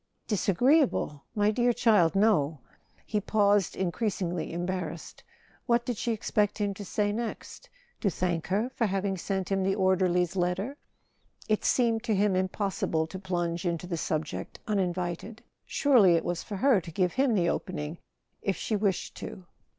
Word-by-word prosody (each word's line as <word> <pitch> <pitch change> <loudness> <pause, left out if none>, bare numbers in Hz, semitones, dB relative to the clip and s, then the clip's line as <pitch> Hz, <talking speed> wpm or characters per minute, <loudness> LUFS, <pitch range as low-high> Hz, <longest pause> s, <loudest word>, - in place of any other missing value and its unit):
"Disagreeable? 215 - +2
My 210 0 +3
dear 240 +2 +2
child, 200 -9 +3
no." 190 -8 +3 0.5
He 210 -1 -1
paused, 205 -2 +2
increasingly 185 -2 -2
embarrassed. 175 -1 -4 0.4
What 235 -1 +2
did 245 - -2
she 235 - -1
expect 210 -1 0
him 205 -2 -1
to 205 - -8
say 205 +1 0
next? 235 - -5 0.3
To 205 - +1
thank 175 -2 -2
her 210 +7 0
for 235 -3 0
having 195 0 -1
sent 190 0 -3
him 195 0 +2
the 195 +1 +1
or¬ 190 -2 +3
derly's 180 -1 +1
letter? 185 +8 -1 0.7
It 215 -1 +1
seemed 230 -3 +2
to 220 -3 +1
him 200 -1 +2
impossible 185 -3 0
to 185 +4 -8
plunge 175 -2 -2
into 170 -1 -2
the 175 -1 -3
subject 155 -1 -3
uninvited. 185 +1 -2 0.2
Surely 235 - +5
it 165 - 0
was 175 -1 -2
for 205 - -6
her 230 0 +3
to 165 - -9
give 180 +2 0
him 260 -3 +2
the 170 -3 +2
opening, 155 -2 -4 0.4
if 195 - 0
she 220 - -1
wished 200 -3 -1
to. 185 - -8
195 Hz, 160 wpm, -28 LUFS, 175-215 Hz, 0.7 s, Surely